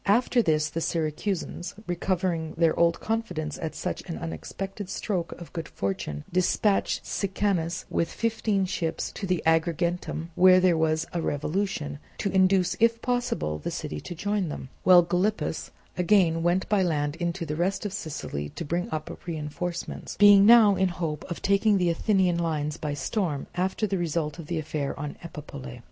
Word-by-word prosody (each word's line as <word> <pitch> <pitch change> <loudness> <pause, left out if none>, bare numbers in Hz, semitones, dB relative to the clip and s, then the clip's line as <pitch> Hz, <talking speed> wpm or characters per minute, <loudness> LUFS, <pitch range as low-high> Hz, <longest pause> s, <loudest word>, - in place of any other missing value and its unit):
After 240 +4 +4
this 155 -6 +2
the 165 - -4
Syracusans, 170 +3 -2
recovering 175 -2 -1
their 165 -1 +3
old 170 0 +3
confidence 220 -10 -3
at 160 -2 -4
such 180 - -3
an 165 - -3
unexpected 195 +4 -6
stroke 180 -4 -2
of 170 - -11
good 165 -2 -4
fortune, 75 -7 -3
dispatched 190 +3 +1
Sicanus 190 -4 -1
with 165 - -1
fifteen 220 -3 0
ships 165 -3 -2
to 195 - -5 0.2
Agrigentum 165 +1 0
where 185 +2 +7
there 180 -2 +4
was 160 0 +1
a 170 - -1
revolution, 150 -1 -2 0.2
to 200 - -1
induce 190 -1 +3
if 230 0 +4
possible 245 - -1
the - - -4
city 75 -1 -5
to 175 - -7
join 205 0 -1
them; 135 - -6
while 180 -1 +7
Gylippus 180 +5 -1 0.3
again 175 -3 +3
went 175 +2 +1
by 210 -2 +2
land 150 -4 0
into 170 0 -2
the 150 -1 -3
rest 185 +5 -1
of 200 - -3
Sicily 75 - -4
to 170 - -4
bring 170 +4 -2
up 155 -1 -4
reinforcements, 170 +2 -4
being 205 -1 +8
now 220 -4 +8
in 190 0 +2
hope 165 -4 -3
of 170 - -5
taking 200 +1 +3
the 180 -2 +2
Athenian 180 -1 +2
lines 155 -3 -1
by 150 -3 -3
storm, 160 -4 -2
after 190 +4 0
the 195 -2 -1
result 160 -2 -2
of 160 - -8
the 170 - -2
affair 150 -3 -3
on 145 0 -4
Epipolae. 145 - -8
175 Hz, 165 wpm, -27 LUFS, 155-195 Hz, 0.3 s, being